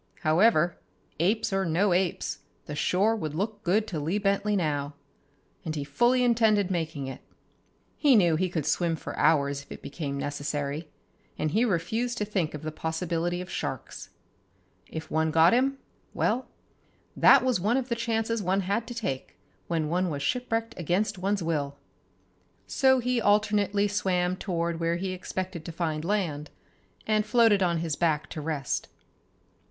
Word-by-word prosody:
However, 170 +1 +3 0.4
apes 205 +4 +1
or 195 0 +1
no 180 +3 +2
apes, 180 0 -1 0.3
the 150 - -6
shore 195 +8 +2
would 155 -8 -4
look 205 +4 -3
good 205 +5 +2
to 165 - -3
Lee 165 +7 -1
Bentley 205 +1 +1
now. 145 -5 -1 0.7
And 160 -3 -3
he 145 - -2
fully 240 - +2
intended 220 -5 +3
making 160 -5 -2
it. 135 - -7 0.8
He 285 -4 +5
knew 175 -6 +4
he 185 +3 0
could 160 -5 -2
swim 170 -2 +1
for - - -7
hours 140 -2 +2
if - - -19
it - - -9
became 140 0 -4
necessary, 145 +2 -3 0.5
and 155 0 -1
he 220 +8 +3
refused 225 +5 -1
to 210 - -1
think 185 -7 -1
of 150 - -8
the 155 - -3
possibility 165 +2 -2
of 180 - -8
sharks. 130 -3 -5 0.8
If 160 0 -7
one 160 0 +1
got 165 +4 +5
him, 270 +3 +2 0.4
well, 255 - 0 0.7
that - - +7
was 255 -6 +2
one 215 +7 +2
of 260 -2 -2
the 235 - +1
chances 230 -1 -1
one 190 +1 +1
had 200 +5 -1
to 240 - -7
take 135 - -4 0.3
when 160 -3 0
one 180 +3 0
was 145 -2 -3
shipwrecked 230 - -1
against 185 +4 0
one's 195 0 0
will. 145 -4 -2 0.9
So 265 -1 +3
he 250 -1 0
alternately 205 -1 +2
swam 185 -3 0
toward 170 -3 -2
where 165 0 +1
he 185 +2 -3
expected 185 -1 -5
to - - -5
find 160 -2 -2
land, 165 -6 -1 0.6
and 215 -1 +2
floated 225 -2 +4
on 175 -2 +2
his 160 -2 -2
back 155 -3 0
to 155 - -5
rest. 150 -3 -2
180 Hz, 165 wpm, -27 LUFS, 155-210 Hz, 0.9 s, that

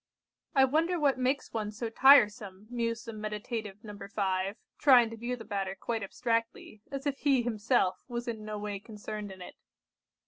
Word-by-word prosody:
"I 265 -1 +7
wonder 330 +6 +1
what 280 -3 +2
makes 260 +2 0
one 215 -2 -2
so 225 +2 -5
tiresome," 210 -6 +5
mused 230 -1 -2
the 230 - -6
meditative 210 -1 -5
No. 210 -2 -8
5, 195 -1 -2 0.2
trying 245 -5 +6
to - - -6
view 240 +2 -3
the 225 -2 -10
matter 195 -2 -3
quite 230 -1 -2
abstractedly, 230 0 -2
as 275 0 -5
if 280 -1 -1
he 275 -4 +3
himself 215 -4 +1
was 240 -1 -4
in 220 -2 -4
no 215 0 -5
way 205 -1 -4
concerned 210 -1 -7
in 185 -1 -9
it. - - -10
225 Hz, 175 wpm, -30 LUFS, 205-245 Hz, 0.2 s, I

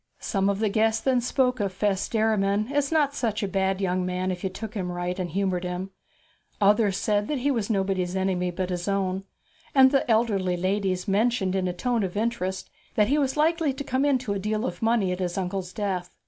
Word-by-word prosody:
Some 195 -2 0
of 200 - 0
the 215 0 +1
guests 220 +2 +1
then 255 -2 +2
spoke 250 0 +1
of 200 -2 0
Fess 195 0 -1
Derriman 215 0 +1
as 285 0 +1
not 295 -3 +2
such 220 -6 -1
a - - 0
bad 190 0 0
young 185 -1 0
man 185 +1 -1
if 180 -1 -5
you 190 - 0
took 215 +3 -7
him 185 -5 -3
right 175 +1 -3
and 180 -1 -2
humoured 185 0 -1
him; 180 +2 -4 0.7
others 205 -1 +3
said 205 -1 0
that 295 - -1
he 275 +3 +1
was 230 -5 -1
nobody's 190 -3 0
enemy 185 -1 0
but 185 +1 -3
his 175 +1 -3
own; 195 -1 -1 0.5
and 265 -1 +7
the 275 -3 +1
elder 220 -2 +3
ladies 185 +1 -1
mentioned 200 -1 +1
in 185 -1 0
a - - 0
tone 235 +6 0
of 190 0 -3
interest 210 -4 -2 0.2
that 210 -1 +3
he 295 +2 +3
was 270 0 0
likely 320 -1 +2
to 280 - -5
come 260 0 0
into 260 -7 +1
a 200 - -2
deal 215 +3 -1
of - - -4
money 225 -4 +2
at 180 - -3
his 180 -1 -2
uncle's 185 -1 -3
death. 185 -4 -3
200 Hz, 215 wpm, -26 LUFS, 185-235 Hz, 0.7 s, and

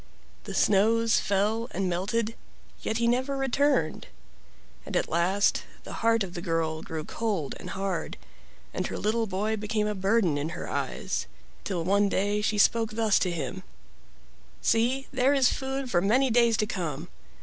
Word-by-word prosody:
The - - -6
snows 225 +3 +3
fell 210 +4 0
and 190 +1 0
melted, 210 +6 -1 0.5
yet 220 - -1
he 235 0 +1
never 260 +3 +1
returned, 270 - +1 0.8
and - - -2
at - - 0
last 180 +5 +2 0.2
the - - -8
heart 230 -1 +3
of 180 -2 -7
the 175 - -5
girl 165 -2 -1
grew 160 -1 -5
cold 200 -7 -2
and - - -8
hard 190 -2 -3 0.6
and - - -2
her - - -5
little 225 +2 0
boy 210 +3 -1
became 210 0 -1
a 210 - -1
burden 195 -5 +1
in 150 +3 -2
her - - -5
eyes, - - -3 0.4
till 180 -4 -2
one 200 +3 +3
day 205 +2 0
she 210 0 0
spoke 225 +1 +3
thus 220 -2 +3
to 185 - +1
him: 175 +2 -4 1.0
"See, 245 +4 +1
there 265 +2 +3
is 265 -3 +4
food 265 -1 -4
for 175 - +3
many 245 +7 +3
days 235 -1 +4
to 215 - +1
come. 170 -9 -4
210 Hz, 165 wpm, -27 LUFS, 185-230 Hz, 1.0 s, is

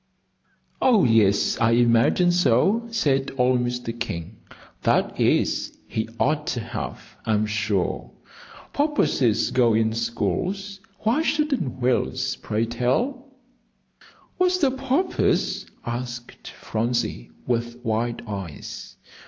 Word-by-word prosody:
"Oh, 235 -6 +5
yes, 110 -4 +3
I 115 0 +4
imagine 120 +9 +4
so," 180 - +3
said 140 -11 +1
old 125 0 +3
Mr. 120 -1 -2
King; 100 -3 -5 0.4
"that - - +1
is, - - +1
he 110 0 -3
ought 150 +1 +1
to 125 - -1
have, 115 +1 -6
I'm 110 -1 +1
sure. 105 -3 -1 0.6
Porpoises 285 - +2
go 120 -3 +3
in 110 0 +2
schools, 185 - -2 0.2
why 235 +8 +2
shouldn't 295 - 0
whales, 125 0 0
pray 110 +2 -1
tell?" 240 - -1 1.1
"What's 365 -1 +2
a 270 - +5
porpoise?" 270 +7 0 0.2
asked 120 0 -6
Phronsie, 115 - -2 0.2
with 120 -1 -1
wide 115 +1 -1
eyes. 95 -7 -7
120 Hz, 105 wpm, -24 LUFS, -, 1.1 s, Oh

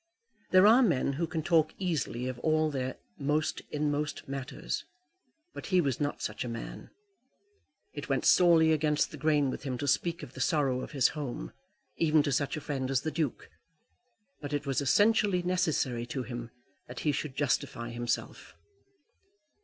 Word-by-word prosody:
There 185 +1 +6
are 230 +5 +7
men 155 - +2
who 165 +4 -1
can 160 -2 -3
talk 160 -2 +2
easily 145 - -2
of 130 -1 -5
all 155 +1 +2
their 130 -2 -3 0.2
most 150 +2 0
inmost 150 0 -2
matters, 135 -1 -4 0.7
but - - -7
he 185 -2 +3
was 140 -7 0
not 145 0 -2
such - - -3
a 125 - -5
man. 115 -1 -7 1.0
It - - -7
went - - 0
sorely 165 -3 +6
against 150 -1 +1
the 155 - -8
grain 145 -2 +2
with - - -6
him 130 -4 -3
to 145 - -3
speak 170 +5 0
of - - -9
the - - -6
sorrow 140 -7 +1
of - - -8
his 135 -3 +4
home, 125 - -5 0.4
even 155 -2 +3
to 145 - -1
such 140 +2 0
a - - -5
friend 135 -3 -3
as 135 -1 +1
the 155 - -3
Duke; 155 -6 -2 0.9
but 145 0 -5
it 145 0 -1
was 135 0 0
essentially 205 - +3
necessary 160 -10 0
to 130 +1 -3
him 120 -2 -6 0.4
that 125 - -7
he 150 - +2
should 145 -1 -4
justify 120 -4 -1
himself. 120 0 -4
145 Hz, 170 wpm, -30 LUFS, 130-160 Hz, 1.0 s, are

